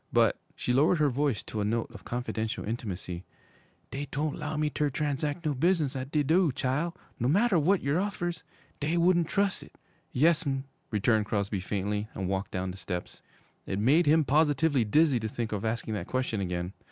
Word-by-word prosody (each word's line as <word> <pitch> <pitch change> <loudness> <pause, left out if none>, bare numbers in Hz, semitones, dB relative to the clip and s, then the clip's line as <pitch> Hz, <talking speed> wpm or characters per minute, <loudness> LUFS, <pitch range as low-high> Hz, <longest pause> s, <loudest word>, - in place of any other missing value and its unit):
But' - - +3 0.2
she 125 - -1
lowered 150 +7 +4
her 150 -2 +3
voice 135 -2 0
to 110 - -4
a - - +1
note 115 +3 -1
of 115 -4 -12
confidential 115 -2 -3
intimacy 95 -5 -4 0.7
'dey 140 +3 -4
doan't 150 +1 -1
'low 150 +1 -4
me 150 0 +1
ter 150 0 0
transac' 150 +3 -2
no 150 - +2
business 155 -1 +1
at 130 0 -4
de 150 0 +1
do', 165 +2 +3
chile, 140 +7 0 0.3
no 120 - +1
matter 200 - +4
w'at 180 +5 +3
yer 140 +5 +1
offers. 175 -4 -2 0.4
Dey 155 +4 0
wouldn't 170 -1 +4
trus' 200 0 +1
it!' - - -15 0.3
'Yes'm,' 145 -2 +2 0.3
returned 105 0 +2
Crosby 100 -1 -1
faintly, 105 +2 -2
and 95 - -2
walked 95 +1 -2
down 95 0 -3
the 95 - -9
steps. 90 -2 -5 0.5
It 95 - -2
made 145 +10 +4
him 155 +2 +5
positively 145 -1 +3
dizzy 140 +4 +3
to 110 - -3
think 115 0 -3
of 105 -2 -2
asking 110 0 -2
that 105 - -4
question 130 -5 -1
again. 90 0 -3
135 Hz, 190 wpm, -29 LUFS, 110-155 Hz, 0.7 s, him